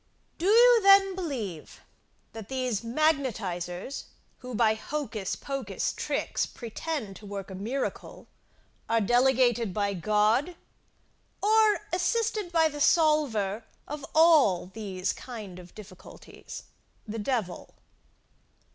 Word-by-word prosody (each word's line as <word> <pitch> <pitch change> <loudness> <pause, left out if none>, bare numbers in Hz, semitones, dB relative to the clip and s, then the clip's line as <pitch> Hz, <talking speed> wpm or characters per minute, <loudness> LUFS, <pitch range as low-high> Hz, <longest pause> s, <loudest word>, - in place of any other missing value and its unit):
Do 350 - -1
you 470 +2 +6
then 390 -1 +6
believe, 245 - -5 0.5
that 220 -2 -9
these 255 -5 -2
magnetisers, 230 - -1 0.3
who, 250 -2 -7
by 220 -1 +3
hocus 220 -5 -4
pocus 265 -8 -3
tricks, - - -2
pretend, 230 - -5
to 210 - -12
work 195 -1 -6
a - - -6
miracle, 225 +9 -4 0.6
are 230 0 +3
delegated 240 -2 +2
by 200 -1 0
God, 215 - +1 0.8
or 430 0 +3
assisted 420 +1 0
by 325 -2 +4
the 295 -1 -6
solver 280 - +2 0.2
of 295 0 -6
all 295 - +5
these 195 -3 -3
kind 210 -8 -9
of 180 -1 -14
difficulties 200 -3 -12 0.4
the 220 +1 -5
devil. 215 -5 -3
240 Hz, 110 wpm, -27 LUFS, 205-310 Hz, 0.8 s, you